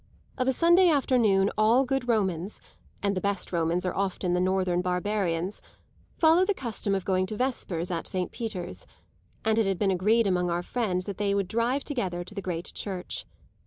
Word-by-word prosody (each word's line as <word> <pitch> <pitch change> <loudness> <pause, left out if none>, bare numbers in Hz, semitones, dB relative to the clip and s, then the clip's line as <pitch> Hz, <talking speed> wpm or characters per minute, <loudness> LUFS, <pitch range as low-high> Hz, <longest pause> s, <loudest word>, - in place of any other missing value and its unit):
Of 255 - -1
a - - +5
Sunday 345 +6 +5
afternoon 230 -9 +3
all 230 +5 +4
good 270 -1 -1
Romans 195 -5 0 0.4
(and 200 -1 +1
the 185 - -1
best 200 -2 -1
Romans 170 +1 0
are 180 - -1
often 190 -2 -1
the 180 - +2
northern 185 -1 +1
barbarians) 180 0 -1 0.6
follow 325 +2 +5
the 400 +1 +1
custom 220 - -2
of 190 - -3
going 185 -1 +1
to 215 - -5
vespers 190 -9 -2
at 170 -2 -3
Saint 185 -2 -2
Peter's; 185 -6 -5 0.6
and 220 0 +3
it 220 - +2
had 195 -2 0
been 195 0 +2
agreed 215 +5 +3
among 180 -2 +1
our 175 +1 -1
friends 185 -5 -1
that 200 -2 -6
they 200 -1 +1
would 200 -2 0
drive 235 +7 0
together 190 - -3
to 185 - -12
the 200 - -4
great 175 -2 -4
church. 185 -3 -4
195 Hz, 190 wpm, -27 LUFS, 180-230 Hz, 0.6 s, a